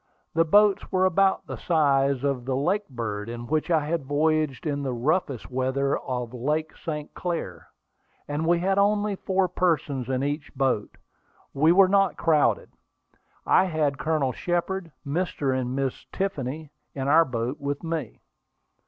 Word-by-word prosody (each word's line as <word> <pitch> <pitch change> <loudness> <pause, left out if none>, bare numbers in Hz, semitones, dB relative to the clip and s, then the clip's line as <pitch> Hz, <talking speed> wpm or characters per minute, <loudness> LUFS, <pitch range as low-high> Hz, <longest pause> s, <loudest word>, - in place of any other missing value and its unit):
The 165 +1 +3
boats 205 +4 +4
were 185 0 +3
about 190 +1 +2
the - - -6
size 140 -5 +2
of 135 -4 -1
the 130 0 -1
Lakebird, 130 - -2
in 120 0 -6
which 155 +6 -1
I 160 -3 +2
had 165 0 -1
voyaged 155 0 0
in 145 -2 -1
the 135 -2 -2
roughest 135 - -1
weather 130 +2 0
of 125 -2 -4
Lake 150 +6 -2
St. 150 -2 -6
Clair; 175 -2 -4 0.6
and 145 +1 -2
as 160 - -1
we 175 0 +4
had 195 +3 +1
only 205 0 +2
four 190 0 0
persons 150 -8 0
in 130 0 0
each 145 +1 -3
boat, 130 -6 -1 0.6
we 155 +4 +4
were 190 +2 +6
not 195 -1 +2
crowded. 155 -3 +2 0.7
I - - +4
had 150 -6 0
Colonel 155 -4 0
Shepard, 175 +3 -2
Mr. 140 -3 -1
and 130 0 -2
Miss 135 -2 -3
Tiffany 155 -5 -3 0.2
in 135 -1 -3
the 155 +4 +6
boat 125 -1 -3
with 145 +1 -3
me. 160 -7 -4
150 Hz, 155 wpm, -25 LUFS, 135-175 Hz, 0.7 s, were